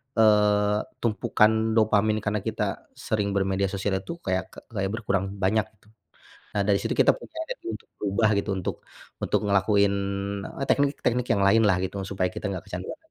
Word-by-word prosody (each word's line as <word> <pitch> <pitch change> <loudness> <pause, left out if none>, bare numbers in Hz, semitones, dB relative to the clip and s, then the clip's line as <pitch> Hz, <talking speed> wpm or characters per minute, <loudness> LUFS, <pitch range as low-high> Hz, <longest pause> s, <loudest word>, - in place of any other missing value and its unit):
eee, 105 -1 +4 0.2
tumpukan 110 0 +2
dopamin 110 -1 +3
kana 105 0 0
kita - - -3
sering 100 -2 -2
bermedia 95 0 +1
sosial 95 0 -1
itu 165 - -7
kayak 95 0 -1
ke - - -13
kayak 95 -4 -1
berkurang 100 -4 -1 0.2
banyak 110 +2 +2
gitu. 105 - -29 0.7
Nah, 100 - +3
dari 100 -1 +3
situ - - -1
kita - - +6
punya 335 -10 -12
niat - - -7 0.2
untuk - - -26
berubah 105 +2 +2
gitu, 100 - -2
untuk 95 - -3 0.5
untuk - - +1
ngelakuin, 100 0 +3 0.6
eee, 135 - -2
teknik-teknik 130 -3 +1
yang 100 -3 +2
lain 110 +3 +5
lah, 95 - +3
gitu 95 +1 -3
supaya 95 -2 0
kita 100 - -4
gak 95 -2 -5
kecanduan. - - -6
105 Hz, 170 wpm, -26 LUFS, 100-110 Hz, 0.7 s, kita